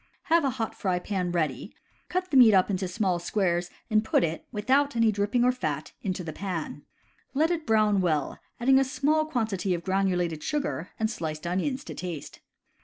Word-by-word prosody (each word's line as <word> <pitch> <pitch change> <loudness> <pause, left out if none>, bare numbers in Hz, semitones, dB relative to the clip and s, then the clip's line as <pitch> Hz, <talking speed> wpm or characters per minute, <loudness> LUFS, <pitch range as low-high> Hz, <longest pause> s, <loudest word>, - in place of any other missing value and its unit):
Have 335 -1 +5
a 275 - +2
hot 235 -4 -3
fry 185 -3 -1
pan 180 -1 -2
ready, 155 - -2 0.3
cut 365 -1 -2
the - - 0
meat 235 -5 +8
up 190 +2 +3
into 190 -1 -1
small 185 -1 0
squares 175 -1 0 0.2
and 215 -2 +2
put 220 - +2
it 165 0 -3
(without 265 +6 +1
any 230 -1 +4
dripping 205 +4 +1
or 250 - +5
fat) 155 - -3
into 185 -2 -3
the 160 -2 -6
pan. 170 -5 -4 0.5
Let 315 +4 +3
it 325 -4 -2
brown 215 -3 +3
well, 155 -6 0 0.2
adding 265 +2 +5
a - - +4
small 285 +4 +1
quantity 215 - -1
of 170 - -6
granulated 180 -4 0
sugar, 280 - -2
and 220 - +2
sliced 160 -7 -5
onions 225 +11 -1
to - - -7
taste. 175 -5 -6
200 Hz, 185 wpm, -27 LUFS, 175-250 Hz, 0.5 s, meat